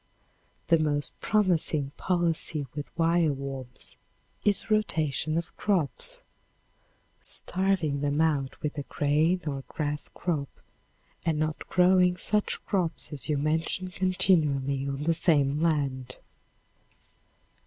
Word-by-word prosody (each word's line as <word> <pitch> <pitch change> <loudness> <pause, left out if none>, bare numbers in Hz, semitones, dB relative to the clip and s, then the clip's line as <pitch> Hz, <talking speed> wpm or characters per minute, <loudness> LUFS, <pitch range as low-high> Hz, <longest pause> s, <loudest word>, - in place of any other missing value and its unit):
The 165 -2 +5
most 145 -2 0
promising 165 -9 +1
policy 165 -4 0
with 145 -1 -5
wire 165 -1 +3
worms 135 -2 -7 0.5
is 205 +1 +1
rotation 155 - +1
of 170 0 -4
crops, 180 - -1 1.0
starving 175 -7 0
them 145 +1 0
out 145 -4 +1
with 150 0 -2
a - - -1
grain 150 +6 +1
or 140 -3 -3
grass 150 -1 -2
crop 155 -6 -2 0.7
and 160 -2 0
not 155 0 -2
growing 180 0 +4
such 210 +3 0
crops 180 -5 -1
as 145 +1 -5
you 150 - +2
mention 160 +5 -1
continually 150 -8 +1
on 140 +1 -3
the 165 +2 +2
same 150 -3 +2
land. 135 -6 0
155 Hz, 110 wpm, -28 LUFS, 145-175 Hz, 1.0 s, The